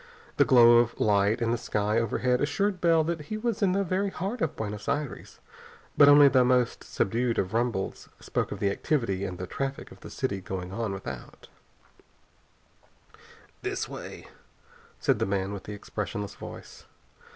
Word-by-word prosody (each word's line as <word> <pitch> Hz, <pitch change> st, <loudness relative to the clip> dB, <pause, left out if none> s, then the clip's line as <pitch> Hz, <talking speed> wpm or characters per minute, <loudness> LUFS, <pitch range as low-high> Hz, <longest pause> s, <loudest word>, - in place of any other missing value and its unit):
The -, -, +5 dB
glow 120 Hz, -2 st, +7 dB
of 120 Hz, 0 st, 0 dB
light 105 Hz, +3 st, +2 dB
in 115 Hz, -, +1 dB
the 120 Hz, -, 0 dB
sky 105 Hz, +1 st, 0 dB
overhead 125 Hz, +2 st, 0 dB
assured 185 Hz, +6 st, 0 dB
Bell 165 Hz, -2 st, +4 dB
that 165 Hz, 0 st, -2 dB
he 215 Hz, +9 st, -5 dB
was 225 Hz, 0 st, -2 dB
in 190 Hz, -3 st, +3 dB
the 200 Hz, +1 st, +1 dB
very 195 Hz, +2 st, 0 dB
heart 200 Hz, +5 st, -4 dB
of 160 Hz, -, -1 dB
Buenos 105 Hz, -1 st, -5 dB
Aires, 145 Hz, -2 st, -4 dB, 0.6 s
but 145 Hz, -, +7 dB
only 145 Hz, 0 st, +8 dB
the 130 Hz, -1 st, +4 dB
most 125 Hz, -1 st, +1 dB
subdued 115 Hz, +3 st, -1 dB
of 95 Hz, +1 st, -1 dB
rumbles 115 Hz, -4 st, -2 dB
spoke -, -, -2 dB
of -, -, -4 dB
the 100 Hz, -, +1 dB
activity 100 Hz, -6 st, -1 dB
and 90 Hz, -2 st, -5 dB
the 90 Hz, -, -5 dB
traffic 135 Hz, +9 st, -5 dB
of -, -, -14 dB
the -, -, -10 dB
city 100 Hz, -8 st, -3 dB
going 90 Hz, -1 st, -5 dB
on 110 Hz, +1 st, -3 dB
without. 70 Hz, -10 st, -8 dB, 2.1 s
"This -, -, -3 dB
way," -, -, -9 dB, 0.7 s
said -, -, +1 dB
the -, -, 0 dB
man 95 Hz, 0 st, -1 dB
with 100 Hz, -, -7 dB
the 105 Hz, -, -6 dB
expressionless 105 Hz, 0 st, -5 dB
voice. -, -, -11 dB
120 Hz, 170 wpm, -27 LUFS, 100-150 Hz, 2.1 s, only